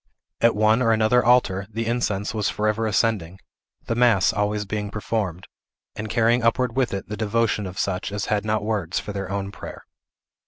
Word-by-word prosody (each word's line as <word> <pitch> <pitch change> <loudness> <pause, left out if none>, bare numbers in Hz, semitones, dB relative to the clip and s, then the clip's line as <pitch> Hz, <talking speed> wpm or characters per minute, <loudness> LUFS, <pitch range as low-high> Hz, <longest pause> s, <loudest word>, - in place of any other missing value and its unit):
At 115 - +4
one 110 +3 +3
or 115 -2 +3
another 115 +2 +3
altar, 100 -6 +3
the 115 +1 -3
incense 110 -4 -1
was 105 -2 0
forever 110 +1 0
ascending; 100 -5 0 0.5
the - - -1
mass 115 -5 +3
always 105 0 -1
being 105 0 -3
performed, 100 -4 -3 0.5
and 110 0 -5
carrying 115 +2 +3
upward 115 +1 +1
with 130 -2 +1
it 100 -1 -4
the 105 - -4
devotion 110 -1 0
of 90 0 -9
such 95 0 -2
as 100 0 -3
had 105 -2 0
not 110 -1 -1
words 100 -6 -1
for 105 - -6
their 100 -1 -4
own 100 0 -3
prayer. - - -9
105 Hz, 185 wpm, -23 LUFS, 100-115 Hz, 0.5 s, At